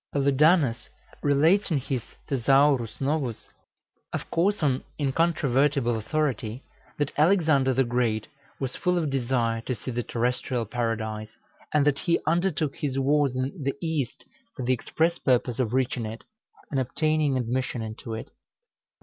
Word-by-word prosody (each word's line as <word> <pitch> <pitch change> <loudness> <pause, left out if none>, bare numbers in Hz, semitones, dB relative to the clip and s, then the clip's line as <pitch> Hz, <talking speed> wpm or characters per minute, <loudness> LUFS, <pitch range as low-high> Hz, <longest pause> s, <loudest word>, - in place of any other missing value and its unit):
Paludanus 140 -1 +3 0.3
relates 160 +9 +3
in 160 - +2
his 130 -1 -2 0.3
"Thesaurus 135 -2 +3
Novus," 135 -4 -2 0.6
of - - -5
course 190 +2 +1
on 130 -3 +1
incontrovertible 140 -4 +2
authority, 120 -1 -2 0.3
that 145 -1 -1
Alexander 155 -6 +4
the 130 +1 +3
Great 120 -3 0 0.3
was 130 -2 -3
full 180 0 +1
of 155 -5 0
desire 120 -3 0
to 125 +2 -3
see 115 +4 -6
the 120 0 -1
terrestrial 120 0 -1
Paradise, 110 -2 -2 0.4
and 150 -2 +3
that 145 -1 +2
he 170 - +2
undertook 165 -3 0
his 135 -3 -2
wars 140 -1 +2
in 130 +6 -3
the 140 0 -1
East 160 -7 -3 0.3
for 130 - -4
the 130 - +3
express 165 +7 0
purpose 125 -2 +1
of 120 -4 +1
reaching 125 -3 0
it, 110 +1 -8 0.5
and 135 - +1
obtaining 150 +2 +1
admission 125 0 -2
into 110 +1 -6
it. 110 - -8
135 Hz, 140 wpm, -26 LUFS, 120-150 Hz, 0.6 s, Alexander